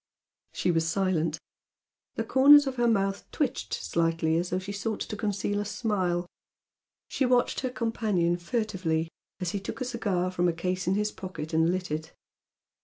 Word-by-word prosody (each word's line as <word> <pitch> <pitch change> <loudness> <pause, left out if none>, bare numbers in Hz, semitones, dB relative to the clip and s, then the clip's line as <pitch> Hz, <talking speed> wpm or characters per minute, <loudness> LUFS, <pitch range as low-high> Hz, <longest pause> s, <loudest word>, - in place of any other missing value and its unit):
She 180 - 0
was 165 -1 +1
silent. 165 -4 0 0.8
The - - -1
corners 285 +2 +7
of 265 -1 -3
her 240 0 +3
mouth 195 -3 0
twitched 275 -4 -2
slightly 165 -1 0
as 175 +1 -1
though 180 - 0
she 190 +2 -5
sought 205 +1 -3
to 215 - -4
conceal 205 -1 -1
a - - 0
smile. 190 -5 -1 0.8
She - - -1
watched 250 -1 +2
her 260 - -2
companion 215 -8 0
furtively 175 -5 -1 0.3
as 180 -3 -2
he 200 - -2
took 195 - -6
a 255 - -2
cigar 200 -7 -1
from 180 -1 +1
a 170 - +2
case 180 +1 -2
in 185 - +3
his 210 +1 0
pocket 180 -4 -7
and 160 +1 +3
lit 185 -2 -3
it. 155 +1 -4
190 Hz, 175 wpm, -28 LUFS, 170-225 Hz, 0.8 s, corners